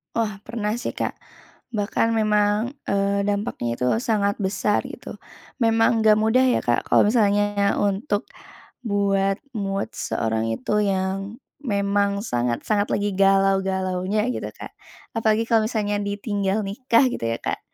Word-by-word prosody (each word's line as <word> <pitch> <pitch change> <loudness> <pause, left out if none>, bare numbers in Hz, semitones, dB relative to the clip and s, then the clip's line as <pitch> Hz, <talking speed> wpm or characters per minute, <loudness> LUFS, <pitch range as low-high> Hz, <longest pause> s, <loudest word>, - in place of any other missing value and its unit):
Wah, 210 -3 -1
pernah 210 -1 -3
sih, 240 +2 -3
Kak. - - -3 0.6
Bahkan 225 0 0
memang, 210 +2 +1 0.2
eee, 200 0 +1
dampaknya 200 - -2
itu 125 - -1 0.2
sangat 205 -4 0
besar 195 +2 +1
gitu. - - -9 0.5
Memang 225 0 +3
enggak 215 -1 +5
mudah 220 +4 +3
ya, 255 -1 +2
Kak, 120 0 0
kalau - - +5
misalnya 205 -2 +2
untuk 205 +2 0 0.6
buat 200 -3 +1 0.2
mood 200 -1 -2
seorang 110 0 -1
itu 130 - 0
yang 195 +2 -2 0.2
memang 200 -3 0
sangat-sangat 125 - 0
lagi 205 0 0
galau-galaunya 195 +1 +1
gitu, - - -4
Kak. - - -11 0.4
Apalagi 225 0 +1
kalau 225 -1 +3
misalnya 205 -3 -1
ditinggal 205 0 -1
nikah 230 +5 +2
gitu 115 - -4
ya, 115 - -1
Kak. - - -2
205 Hz, 130 wpm, -23 LUFS, 195-220 Hz, 0.6 s, enggak